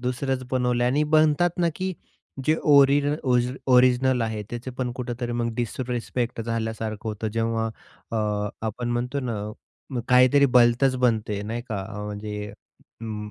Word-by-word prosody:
दुसरंच 130 Hz, +1 st, -2 dB
बनवलं 125 Hz, -1 st, +1 dB
आणि 135 Hz, +5 st, +2 dB
बनतात 155 Hz, +3 st, +4 dB
ना 170 Hz, -1 st, +3 dB
की 185 Hz, 0 st, -2 dB, 0.5 s
जे 155 Hz, -, +3 dB
ओरि 140 Hz, -1 st, +6 dB, 0.7 s
ओरिजिनल 125 Hz, 0 st, +4 dB
आहे 110 Hz, -2 st, -2 dB
त्याचे 120 Hz, +2 st, -5 dB
पण 125 Hz, -1 st, -1 dB
कुठेतरी 120 Hz, -1 st, -4 dB
मग 120 Hz, 0 st, -1 dB
डिसरेस्पेक्ट 120 Hz, 0 st, -3 dB
झाल्यासारखं 110 Hz, -1 st, -3 dB
होतं. 110 Hz, +1 st, -3 dB
जेव्हा 115 Hz, 0 st, -1 dB, 0.5 s
अ, 105 Hz, -2 st, 0 dB, 0.2 s
आपण 120 Hz, +3 st, -3 dB
म्हणतो 125 Hz, +4 st, -1 dB
ना. 120 Hz, -3 st, -3 dB, 0.6 s
मग 125 Hz, -, -1 dB
काहीतरी 130 Hz, +3 st, +6 dB
भलतच 125 Hz, +1 st, +4 dB
बनते 110 Hz, -5 st, 0 dB
नाही 115 Hz, +3 st, -4 dB
का 110 Hz, -, -2 dB, 0.3 s
म्हणजे 105 Hz, 0 st, -5 dB, 0.5 s
उं, 105 Hz, -2 st, -5 dB
120 Hz, 135 wpm, -25 LUFS, 110-130 Hz, 0.7 s, ओरि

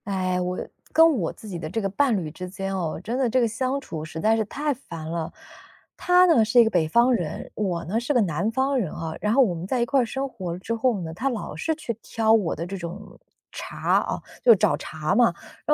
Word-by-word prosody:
唉， 185 Hz, -2 st, 0 dB
我 180 Hz, 0 st, -2 dB, 0.3 s
跟 325 Hz, -2 st, +5 dB
我 165 Hz, -, -1 dB
自 220 Hz, -, -13 dB
己 180 Hz, -4 st, -5 dB
的 155 Hz, -2 st, -5 dB
这 190 Hz, -, -2 dB
个 200 Hz, -, -1 dB
伴 245 Hz, +2 st, +2 dB
侣 160 Hz, -5 st, -4 dB
之 180 Hz, +3 st, -7 dB
间 195 Hz, +1 st, -4 dB
哦， 165 Hz, -5 st, -2 dB
真 235 Hz, +5 st, -2 dB
的 255 Hz, -3 st, +2 dB
这 255 Hz, -, +2 dB
个 235 Hz, -, +3 dB
相 255 Hz, +5 st, -1 dB
处 165 Hz, -, -7 dB
实 160 Hz, +1 st, -7 dB
在 220 Hz, +6 st, +3 dB
是 225 Hz, -, +1 dB
太 290 Hz, +7 st, -2 dB
烦 165 Hz, -, -9 dB
了。 165 Hz, -1 st, -3 dB, 0.6 s
他 360 Hz, 0 st, +5 dB
呢， 325 Hz, -11 st, +5 dB
是 230 Hz, +3 st, +4 dB
一 -, -, +9 dB
个 220 Hz, -, 0 dB
北 165 Hz, -3 st, +2 dB
方 235 Hz, +9 st, +4 dB
人， 175 Hz, -9 st, -3 dB
我 180 Hz, -5 st, -2 dB
呢， 210 Hz, +7 st, 0 dB
是 245 Hz, +4 st, -2 dB
个 255 Hz, -, +4 dB
南 185 Hz, +3 st, 0 dB
方 265 Hz, +4 st, +1 dB
人 185 Hz, -9 st, -2 dB
啊， 160 Hz, -1 st, -5 dB
然 210 Hz, -, +1 dB
后 270 Hz, +2 st, +6 dB
我 200 Hz, -8 st, 0 dB
们 170 Hz, +2 st, -6 dB
在 255 Hz, +4 st, 0 dB
一 235 Hz, -, +2 dB
块 275 Hz, +1 st, +2 dB
儿 -, -, 0 dB
生 270 Hz, +4 st, -3 dB
活 185 Hz, -9 st, -5 dB
之 190 Hz, +5 st, -4 dB
后 230 Hz, -2 st, +1 dB
呢， 160 Hz, -1 st, -5 dB
他 255 Hz, +11 st, -1 dB
老 235 Hz, -5 st, -5 dB
是 320 Hz, 0 st, -1 dB
去 305 Hz, -7 st, -4 dB
挑 220 Hz, -1 st, +1 dB
我 205 Hz, -7 st, +2 dB
的 170 Hz, -, -4 dB
这 190 Hz, +3 st, -5 dB
种 170 Hz, -2 st, -8 dB, 0.3 s
茬 -, -, 0 dB
啊， -, -, -3 dB, 0.2 s
就 245 Hz, -, +8 dB
是 -, -, +9 dB
找 210 Hz, +2 st, +3 dB
茬 155 Hz, 0 st, -3 dB
嘛， 245 Hz, -, +5 dB, 0.4 s
然 300 Hz, -, +5 dB
215 Hz, 275 characters per minute, -24 LUFS, 175-250 Hz, 0.6 s, 一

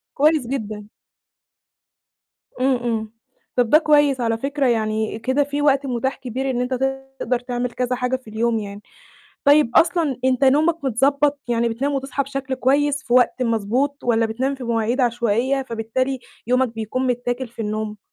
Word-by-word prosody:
كويس 300 Hz, -3 st, +3 dB
جدًا. 215 Hz, -5 st, -4 dB, 1.7 s
إمم، 260 Hz, 0 st, +3 dB
إمم. 225 Hz, -3 st, -3 dB, 0.4 s
طَب 245 Hz, -3 st, +2 dB
ده 305 Hz, -, +7 dB
كويس 290 Hz, -4 st, +3 dB
على 230 Hz, -1 st, 0 dB
فكرة 275 Hz, +3 st, -1 dB
يعني 220 Hz, -1 st, 0 dB
كده 260 Hz, +5 st, +1 dB
في 285 Hz, +1 st, -3 dB
وقت 280 Hz, -1 st, +3 dB
متاح 265 Hz, +1 st, -1 dB
كبير 265 Hz, +1 st, -4 dB
إن 245 Hz, -2 st, -1 dB
أنت 250 Hz, +1 st, -2 dB, 0.5 s
تقدر 250 Hz, 0 st, 0 dB
تعمل 245 Hz, 0 st, -3 dB
كذا 250 Hz, 0 st, -1 dB
حاجة 250 Hz, +1 st, -1 dB
في 255 Hz, -4 st, -9 dB
اليوم 225 Hz, +1 st, 0 dB
يعني. 205 Hz, -1 st, -7 dB, 0.6 s
طيب 290 Hz, -3 st, +5 dB
أصلًا 330 Hz, -5 st, +3 dB
أنت 260 Hz, +1 st, +2 dB
نومك 305 Hz, +4 st, +3 dB
متضبّط 280 Hz, +3 st, +2 dB
يعني 235 Hz, 0 st, +1 dB
بتنام 260 Hz, +6 st, -2 dB
وتصحى 275 Hz, +1 st, -2 dB
بشكل 275 Hz, -1 st, -4 dB
كويس 285 Hz, +3 st, +1 dB
في 240 Hz, -, -4 dB
وقت 250 Hz, +1 st, +3 dB
مضبوط 240 Hz, +5 st, 0 dB
والّا 230 Hz, -1 st, +2 dB
بتنام 255 Hz, +5 st, -2 dB
في 265 Hz, -2 st, -8 dB
مواعيد 230 Hz, +2 st, 0 dB
عشوائية، 240 Hz, +2 st, +1 dB
فبالتالي 255 Hz, +2 st, -2 dB, 0.3 s
يومك 250 Hz, +2 st, +2 dB
بيكون 225 Hz, +4 st, -2 dB
متّاكل 245 Hz, 0 st, -2 dB
في 235 Hz, 0 st, -7 dB
النوم؟ 215 Hz, 0 st, -3 dB
255 Hz, 160 wpm, -21 LUFS, 230-275 Hz, 1.7 s, ده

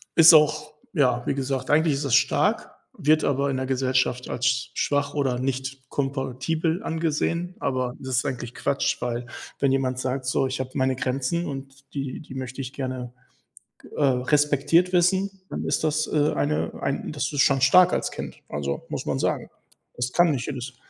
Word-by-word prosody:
ist 165 Hz, 0 st, +9 dB
auch 155 Hz, 0 st, +4 dB, 0.2 s
ja, 125 Hz, -4 st, +3 dB
wie -, -, +2 dB
gesagt, 135 Hz, -1 st, -2 dB
eigentlich 155 Hz, +1 st, +4 dB
ist 140 Hz, -, -3 dB
das 130 Hz, -, +3 dB
stark, -, -, +2 dB, 0.2 s
wird 155 Hz, +1 st, +3 dB
aber 140 Hz, 0 st, +1 dB
in 135 Hz, -, -1 dB
der 130 Hz, -, -2 dB
Gesellschaft 130 Hz, -1 st, 0 dB
als 125 Hz, 0 st, 0 dB
schwach 145 Hz, 0 st, 0 dB
oder 135 Hz, -4 st, 0 dB
nicht 130 Hz, 0 st, -4 dB
kompatibel 140 Hz, -, -1 dB
angesehen. 165 Hz, +2 st, -1 dB
Aber 130 Hz, -2 st, -1 dB
das 130 Hz, -1 st, -3 dB
ist 130 Hz, -, +1 dB
eigentlich 125 Hz, -3 st, -4 dB
Quatsch, 140 Hz, -, 0 dB
weil 120 Hz, 0 st, -2 dB, 0.3 s
wenn 140 Hz, -1 st, +2 dB
jemand 130 Hz, -1 st, 0 dB
sagt: 130 Hz, 0 st, -2 dB
„So, 130 Hz, +1 st, +1 dB
ich 130 Hz, 0 st, -4 dB
habe 130 Hz, -, -5 dB
meine 130 Hz, -1 st, +1 dB
Grenzen 135 Hz, +7 st, -1 dB
und 135 Hz, 0 st, -9 dB
die 135 Hz, -2 st, -4 dB
die 145 Hz, -, -11 dB
möchte 130 Hz, +1 st, -5 dB
ich 130 Hz, -1 st, -6 dB
gerne, 130 Hz, -2 st, -4 dB, 0.9 s
äh, -, -, -1 dB
respektiert 145 Hz, +6 st, +3 dB
wissen“, 185 Hz, +2 st, +3 dB, 0.2 s
dann -, -, -4 dB
ist -, -, 0 dB
das, 155 Hz, 0 st, +1 dB
äh, 150 Hz, 0 st, +2 dB
eine 150 Hz, +1 st, 0 dB
ein 140 Hz, -, -2 dB
das 145 Hz, -2 st, -2 dB
ist 145 Hz, -, +2 dB
schon 135 Hz, -2 st, +4 dB
stark 180 Hz, +6 st, +6 dB
als -, -, -1 dB
Kind, -, -, -7 dB
also, 70 Hz, -1 st, -3 dB
muss -, -, -4 dB
man -, -, -1 dB
sagen. -, -, -1 dB, 0.5 s
Das 125 Hz, +1 st, -2 dB
kann 175 Hz, -2 st, +4 dB
nicht 125 Hz, -4 st, -2 dB
jedes. 130 Hz, -3 st, -5 dB
135 Hz, 180 wpm, -25 LUFS, 130-150 Hz, 0.9 s, ist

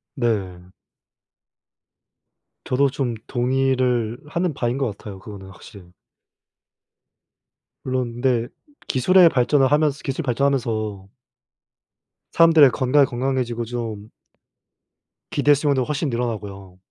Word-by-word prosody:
네. 95 Hz, -8 st, -3 dB, 1.9 s
저도 135 Hz, +2 st, +2 dB
좀 130 Hz, -3 st, -3 dB
동의를 125 Hz, -2 st, 0 dB
하는 170 Hz, +2 st, -2 dB
바인 120 Hz, -1 st, -2 dB
것 135 Hz, -, 0 dB
같아요, 100 Hz, -3 st, -10 dB
그거는 95 Hz, -1 st, -11 dB
확실히. 95 Hz, -1 st, -15 dB, 1.9 s
물론 130 Hz, -2 st, -3 dB
근데 120 Hz, -3 st, +1 dB, 0.4 s
기술의 175 Hz, +7 st, +5 dB
발전을 135 Hz, 0 st, +2 dB
하면서 150 Hz, -1 st, +2 dB
기술이 135 Hz, +4 st, -3 dB
발전하면서 115 Hz, -7 st, -1 dB, 1.2 s
사람들의 160 Hz, -5 st, +6 dB
건강이 135 Hz, +3 st, +3 dB
건강해지고 120 Hz, -2 st, -2 dB
좀 110 Hz, -3 st, -6 dB, 1.2 s
기대수명도 145 Hz, -1 st, +2 dB
훨씬 150 Hz, +2 st, -2 dB
늘어나고요. 105 Hz, -6 st, -5 dB
125 Hz, 240 characters per minute, -22 LUFS, 110-140 Hz, 1.9 s, 사람들의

